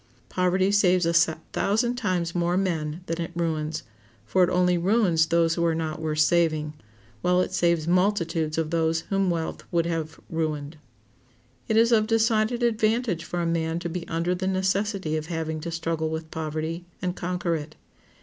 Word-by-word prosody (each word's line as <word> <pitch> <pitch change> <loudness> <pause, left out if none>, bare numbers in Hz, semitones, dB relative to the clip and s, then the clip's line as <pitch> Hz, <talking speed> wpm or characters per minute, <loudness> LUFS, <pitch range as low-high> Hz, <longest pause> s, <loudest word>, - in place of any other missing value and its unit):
Poverty 185 +1 +2
saves 185 -3 +4
a 170 - +1
thousand 195 +8 +1
times 185 -8 -1
more 175 0 +1
men 165 -4 -1
than 165 -1 -3
it 165 - -3
ruins; 155 -2 -2 0.4
for 180 +12 +3
it 175 - +3
only 180 0 +3
ruins 175 -3 +3
those 165 0 +3
who 170 - -1
are 165 -1 +2
not 160 -1 -3
worth 155 -1 -2
saving, 155 -2 +2 0.5
while 180 +5 +3
it 185 - 0
saves 170 -3 +1
multitudes 170 -4 +1
of 160 -1 -1
those 165 -1 +1
whom 195 -1 +2
wealth 165 -2 -2
would 170 -1 +2
have 160 -2 -3
ruined. 155 -2 -3 0.9
It 220 - +2
is 230 +1 +5
of 215 -2 +4
decided 225 +1 +2
advantage 220 -5 +1
for 175 +1 -3
a - - -1
man 165 -1 0
to 170 0 -4
be 170 0 -5
under 165 +2 0
the 185 +1 -2
necessity 190 -3 0
of 155 0 -5
having 160 -2 -3
to 170 - -5
struggle 165 -1 -2
with 160 0 -5
poverty, 160 +2 -3 0.2
and 180 0 -2
conquer 180 -1 -2
it. 155 0 -6
170 Hz, 175 wpm, -25 LUFS, 160-185 Hz, 0.9 s, is